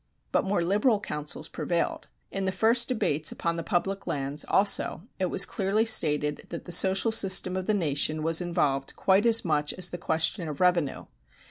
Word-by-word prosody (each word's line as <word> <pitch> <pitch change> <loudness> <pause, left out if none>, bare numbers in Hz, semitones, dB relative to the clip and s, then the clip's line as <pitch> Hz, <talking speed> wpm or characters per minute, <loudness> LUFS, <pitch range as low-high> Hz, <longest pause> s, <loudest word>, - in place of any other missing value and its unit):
But - - +1
more 190 -3 0
liberal 210 +5 +1
counsels 150 -4 -4
prevailed. 170 0 -3 0.2
In 195 -1 -3
the 190 - 0
first 230 +5 +2
debates 155 - 0
upon 170 0 -3
the 165 - -4
public 195 +4 -2
lands, 140 +1 -3
also, 195 -3 +1 0.2
it 185 - 0
was 190 - +3
clearly 205 +3 -1
stated 150 -8 0
that 170 - -8
the - - -9
social 190 +5 +5
system 190 -3 +2
of 185 -1 -4
the 215 - +1
nation 155 -3 -1
was 165 +2 +3
involved 150 -6 -2
quite 195 +4 +2
as 230 -2 +3
much 150 -2 0
as 180 -1 0
the 175 - -6
question 165 +1 -1
of 145 - -7
revenue. 175 -6 0
180 Hz, 185 wpm, -26 LUFS, 155-195 Hz, 0.2 s, social